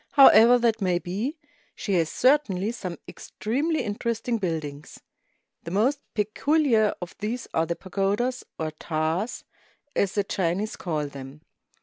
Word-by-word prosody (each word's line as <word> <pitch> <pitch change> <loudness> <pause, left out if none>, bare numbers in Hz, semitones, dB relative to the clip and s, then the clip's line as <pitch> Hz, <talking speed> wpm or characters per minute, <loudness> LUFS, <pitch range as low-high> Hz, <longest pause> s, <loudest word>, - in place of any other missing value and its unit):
However 245 -4 +8
that 230 -2 +1
may 180 -2 +2
be, 205 - -3 0.4
she 200 - -3
has 165 -3 +2
certainly 230 -7 +2
some 185 -7 -6
extremely 290 +9 -2
interesting 230 +2 -2
buildings. 155 -6 -4 0.6
The - - -7
most 235 +10 +1 0.2
peculiar 225 +1 +2
of 175 - -9
these 225 +4 -3
are 160 0 +1
the 170 - -1
pagodas, 200 +8 -1
or 160 -1 -3
taas, 160 +7 -2 0.5
as 195 -1 +1
the 205 - +1
Chinese 195 +3 -1
call 155 -4 -2
them. 140 +1 -9
205 Hz, 130 wpm, -25 LUFS, 170-235 Hz, 0.6 s, However